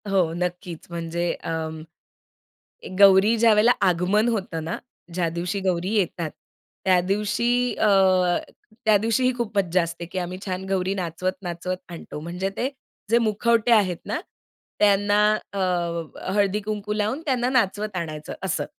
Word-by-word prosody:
हो. 180 -5 +2
नक्कीच. 175 -1 -4
म्हणजे 170 0 -2
अंम, 160 -1 -4 1.2
गौरी 200 +3 +7
ज्यावेळेला 225 0 +5 0.2
आगमन 185 +6 +2
होतं 185 -8 -2
ना, 165 - -3 0.4
ज्या 175 -1 0
दिवशी 175 +4 -3
गौरी 185 +1 -1
येतात, 175 -5 -1 0.5
त्या 185 -1 +5
दिवशी 235 +6 0
अ, 215 - +2 1.0
त्या 215 -1 +6
दिवशीही 230 +5 +1
खूप 225 -3 -3
मज्जा 185 -2 +2
असते. 170 +1 -6
की 175 +2 -8
आम्ही 180 +1 -4
छान 185 -1 -3
गौरी 190 0 0
नाचवत-नाचवत 180 0 -3
आणतो. 170 -3 -8
म्हणजे 175 +4 -3
ते 255 - 0 0.4
जे 230 - +5
मुखवटे 230 +1 +2
आहेत 195 -6 +4
ना, - - -2 0.6
त्यांना 205 0 +4 0.3
अ, 200 - -3 0.7
हळदी-कुंकू 210 +1 0
लावून 215 +7 -1
त्यांना 250 -3 +1
नाचवत 215 -5 0
आणायचं 155 -3 -5
असं. 155 -5 -1
190 Hz, 130 wpm, -24 LUFS, 175-215 Hz, 1.2 s, गौरी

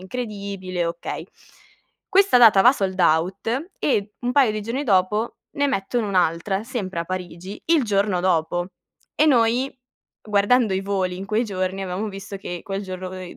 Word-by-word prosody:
incredibile, 195 -4 -4
okay". 170 0 -5 0.8
Questa 390 -8 +5
data 220 -5 +7
va 245 - +7
sold 190 -7 -2
out 190 - +1
e 210 -6 0
un 245 0 -1
paio 265 -4 +4
di 215 - -3
giorni 235 +6 -3
dopo, 210 +1 +1 0.2
ne 285 0 +1
mettono 220 -1 -1
un'altra, 185 +2 0
sempre 200 -8 -4
a - - -3
Parigi, 185 +1 -6
il 325 -3 +4
giorno 200 -3 +1
dopo. 175 0 0 0.5
E 310 - +3
noi, 245 -1 +3 0.5
guardando 210 +2 +2
i 190 - 0
voli 190 -2 -1
in 195 - -6
quei 215 +3 +1
giorni, 190 -2 -3
avevamo 190 +3 -3
visto, 195 0 -7
che 175 -3 -6
quel 195 0 -4
giorno 185 -1 -6
noi 185 -1 -8
200 Hz, 160 wpm, -23 LUFS, 185-230 Hz, 0.8 s, data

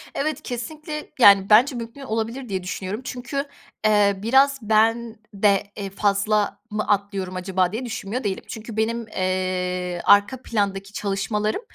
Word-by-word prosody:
Evet, 305 +1 -2
kesinlikle 300 +5 -6
yani, 200 -3 +7
bence 245 +6 +6
mümkün 235 +3 -7
olabilir 230 0 -3
diye 190 -2 -2
düşünüyorum 190 +4 -4
çünkü, 260 +3 -4 0.4
eee, 205 -2 +4
biraz 275 +4 +4
ben 225 +2 +2 0.2
de, 200 0 +2
eee, 200 -2 -4
"Fazla 205 +1 +1
mı 215 0 -2
atlıyorum 200 -2 -1
acaba?" 185 -1 0
diye 230 +5 -4
düşünmüyor 225 +1 -4
değilim. 195 -2 -2
Çünkü 220 0 -8
benim, 230 +1 -1
eee, 180 -2 -2
arka 205 +6 +4
plandaki 200 -3 -2
çalışmalarım 210 - -1
210 Hz, 140 wpm, -23 LUFS, 195-235 Hz, 0.4 s, yani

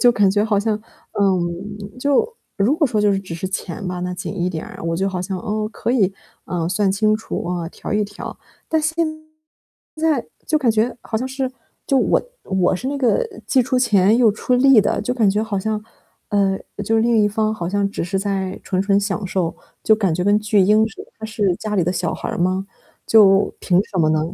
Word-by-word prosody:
就 245 -1 +6
感 205 -4 +3
觉 205 +2 +2
好 210 -2 +2
像 215 0 -1 0.4
嗯， 195 +3 -1
就 285 - +2 0.2
如 220 +9 +2
果 315 - +3
说 220 -5 0
就 205 -1 +3
是 195 - +1
只 185 -4 -7
是 185 +3 -4
钱 190 +1 -5
嘛 180 -1 -3
吧， - - -5
那 180 0 -3
紧 185 +1 -5
一 175 - +1
点， 165 -3 -5 0.2
我 165 - 0
就 190 +3 0
好 185 -2 -3
像， 190 +1 -3
哦， 215 +3 -2
可 - - -2
以， 200 -6 +2 0.3
呃， 170 -2 -2
算 195 +1 +1
清 215 +1 +2
楚 220 - -5
啊， 175 -1 -3
调 - - -7
一 210 0 +2
调。 205 0 -8 0.3
但 320 -1 +2
现 320 +1 -1 1.0
在 310 -5 +1 0.2
就 310 - +2
感 260 -6 +2
觉 220 +3 +1
好 220 - -2
像 255 - -3
是， 265 0 -3 0.4
就 270 - +4
我 - - +2 0.2
我 185 -2 +1
是 245 - -6
那 285 +2 -1
个 280 - +2 0.2
既 265 - +4
出 255 +1 -1
钱 215 -4 +4
又 240 -3 +5
出 220 +4 -1
力 255 -2 +6
的， 205 - 0
就 250 - -1
感 225 -5 +3
觉 210 +2 +1
好 215 -3 -2
像， 215 +2 -2 0.5
嗯， 195 -2 +1 0.2
就 225 - 0
是 225 - +3
另 235 -1 +3
一 - - +4
方 215 +1 0
好 170 -5 -4
像 200 +1 0
只 200 - -3
是 185 +3 -1
在 195 -1 -2
纯 185 -2 -1
纯 195 0 +3
享 200 0 -2
受， 180 -2 -1 0.3
就 220 - +5
感 195 -5 +1
觉 180 - -1
跟 205 +1 +4
巨 210 0 +1
婴 210 +3 +4
似 220 - -10
的， - - -28
他 220 - -7
是 210 -4 0
家 215 -1 -4
里 180 - +2
的 180 - 0
小 175 -2 -1
孩 - - -5
儿 - - -3
吗， 185 +2 0 0.4
就 200 -3 +5
凭 180 -1 +3
什 190 - -5
么 160 -2 +4
呢？ 155 0 +2
205 Hz, 245 characters per minute, -20 LUFS, 185-225 Hz, 1.0 s, 就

